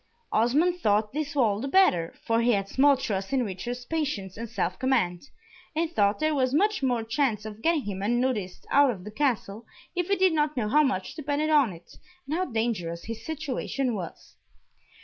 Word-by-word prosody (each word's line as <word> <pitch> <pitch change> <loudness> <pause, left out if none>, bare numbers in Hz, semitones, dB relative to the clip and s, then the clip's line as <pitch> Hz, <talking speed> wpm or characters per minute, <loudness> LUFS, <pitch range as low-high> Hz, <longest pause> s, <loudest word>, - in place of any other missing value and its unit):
Osmond 300 +11 +2
thought 210 -5 +1
this 295 0 -3
all 220 -7 +2
the 270 - -3
better, 270 - +3
for 230 0 +2
he 240 +1 +3
had 195 -1 0
small 280 +5 +4
trust 195 -6 -3
in 260 -3 +1
Richard's 240 +6 -5
patience 285 - -3
and 230 +1 -6
self 180 -1 -2
command, 240 -5 0 0.5
and 330 +1 0
thought 205 -8 +2
there 310 0 +1
was 260 -2 +1
much 415 +4 +2
more 245 -4 +1
chance 225 -2 0
of 215 0 -8
getting 325 -1 +2
him 195 -2 -5
unnoticed 230 -3 -1
out 285 -1 +6
of 195 -7 -4
the 210 - -8
Castle, 230 -4 -1 0.3
if 355 -1 -1
he 400 - +2
did 375 -2 +3
not 300 -2 0
know 215 -3 0
how 300 +6 +5
much 260 -10 -1
depended 300 0 -1
on 285 -8 +4
it, 170 -1 -14 0.3
and 290 - -4
how 365 +3 0
dangerous 220 - -2
his 225 0 -7
situation 275 -4 -2
was. 180 -6 -8
245 Hz, 190 wpm, -27 LUFS, 210-295 Hz, 0.5 s, out